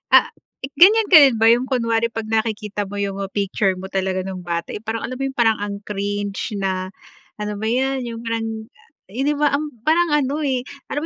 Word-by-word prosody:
Ah, -, -, +8 dB, 0.5 s
ganyan 420 Hz, +4 st, +7 dB
ka 365 Hz, -, +7 dB
rin 265 Hz, -5 st, +4 dB
ba 225 Hz, -, +4 dB
yung 235 Hz, +2 st, +5 dB
kunwari 230 Hz, -2 st, +1 dB
'pag 225 Hz, -1 st, -5 dB
nakikita 215 Hz, -2 st, -2 dB
mo 205 Hz, -, -5 dB
yung 200 Hz, -1 st, -2 dB
picture 195 Hz, -1 st, 0 dB
mo 190 Hz, -, -7 dB
talaga 190 Hz, -1 st, -1 dB
nung 185 Hz, -1 st, -6 dB
bata, 170 Hz, -1 st, -4 dB
eh, 210 Hz, -, -6 dB
parang 225 Hz, 0 st, -3 dB
alam 255 Hz, -, -6 dB
mo 270 Hz, -, -6 dB
yung 270 Hz, -1 st, -7 dB
parang 225 Hz, -2 st, +3 dB
ang 200 Hz, -1 st, -4 dB
cringe 205 Hz, 0 st, -3 dB
na 185 Hz, -1 st, -2 dB, 0.5 s
ano 210 Hz, 0 st, -3 dB
ba 215 Hz, -, -5 dB
yan 265 Hz, +2 st, 0 dB
yung 230 Hz, -1 st, -6 dB
parang 225 Hz, -1 st, -3 dB, 0.4 s
hindi 270 Hz, +8 st, 0 dB
ba 295 Hz, 0 st, +2 dB
ang 295 Hz, +1 st, -1 dB, 0.2 s
parang 335 Hz, +2 st, +3 dB
ano, 290 Hz, +1 st, 0 dB
eh, 260 Hz, -3 st, 0 dB, 0.3 s
alam 290 Hz, -, -1 dB
225 Hz, 200 wpm, -21 LUFS, 200-265 Hz, 0.5 s, Ah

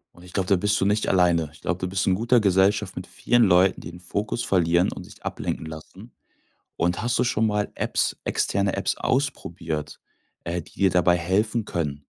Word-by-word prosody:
Und 90 Hz, -, -16 dB
ich 90 Hz, -, -13 dB
glaub, 95 Hz, -1 st, -1 dB
da 100 Hz, -, +4 dB
bist 105 Hz, +3 st, +1 dB
du -, -, +1 dB
nicht 105 Hz, +1 st, +1 dB
alleine. 85 Hz, -4 st, +3 dB
Ich 75 Hz, -, -17 dB
glaub, 90 Hz, -, -1 dB
da 90 Hz, -, -2 dB
bist 95 Hz, +1 st, -1 dB
du -, -, +2 dB
in -, -, +3 dB
guter 120 Hz, +4 st, +3 dB
Gesellschaft 100 Hz, 0 st, +2 dB
mit 90 Hz, -, -6 dB
vielen 120 Hz, +6 st, +1 dB
Leuten, 95 Hz, -1 st, +4 dB
die -, -, -8 dB
ihren 90 Hz, +1 st, -11 dB
Fokus 105 Hz, +6 st, -3 dB
verlieren 85 Hz, -1 st, +2 dB
und -, -, -8 dB
sich -, -, -15 dB
ablenken -, -, -4 dB
lassen. 80 Hz, 0 st, -11 dB, 0.6 s
Und 90 Hz, +3 st, 0 dB
hast 120 Hz, +2 st, 0 dB
du -, -, +2 dB
schon 110 Hz, -3 st, +1 dB
mal 105 Hz, -1 st, -1 dB
Apps- -, -, -1 dB
externe 100 Hz, 0 st, 0 dB
Apps- -, -, 0 dB
ausprobiert, 85 Hz, -, -2 dB, 0.4 s
äh, 85 Hz, +1 st, -3 dB
die 85 Hz, -, -18 dB
dir 95 Hz, -, +5 dB
dabei 90 Hz, 0 st, +3 dB
helfen 105 Hz, +6 st, 0 dB
können? 75 Hz, -6 st, -4 dB
95 Hz, 205 wpm, -24 LUFS, 85-105 Hz, 0.6 s, dir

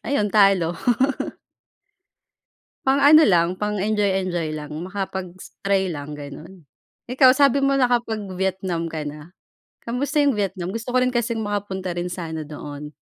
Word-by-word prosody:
Ayun, 210 Hz, -6 st, -1 dB
talo. 195 Hz, -5 st, +4 dB, 2.1 s
Pang 270 Hz, +1 st, +3 dB
ano 305 Hz, +3 st, +8 dB
lang, 175 Hz, -2 st, +3 dB
pang-enjoy-enjoy 195 Hz, -5 st, -1 dB
lang. 150 Hz, -1 st, -8 dB
Makapag 190 Hz, -1 st, -5 dB
s -, -, -13 dB
try 195 Hz, -1 st, +2 dB
lang, 150 Hz, -2 st, -6 dB
ganon. 150 Hz, +4 st, -11 dB, 0.4 s
Ikaw 255 Hz, +1 st, +6 dB
sabi 275 Hz, 0 st, +3 dB
mo 275 Hz, 0 st, +2 dB
nakapag-Vietnam 190 Hz, -8 st, -1 dB
ka 155 Hz, -2 st, -4 dB
na. 150 Hz, +3 st, -8 dB, 0.5 s
Kamusta 280 Hz, +5 st, -1 dB
yung 280 Hz, -5 st, +3 dB
Vietnam? 190 Hz, -3 st, -2 dB
Gusto 230 Hz, +2 st, -4 dB
ko -, -, +4 dB
rin 255 Hz, 0 st, +2 dB
kasing 235 Hz, -1 st, 0 dB
makapunta 195 Hz, -3 st, -3 dB
rin 175 Hz, +1 st, -2 dB
sana 160 Hz, -3 st, -5 dB
doon. 150 Hz, 0 st, -8 dB
190 Hz, 135 wpm, -22 LUFS, 170-235 Hz, 2.1 s, ano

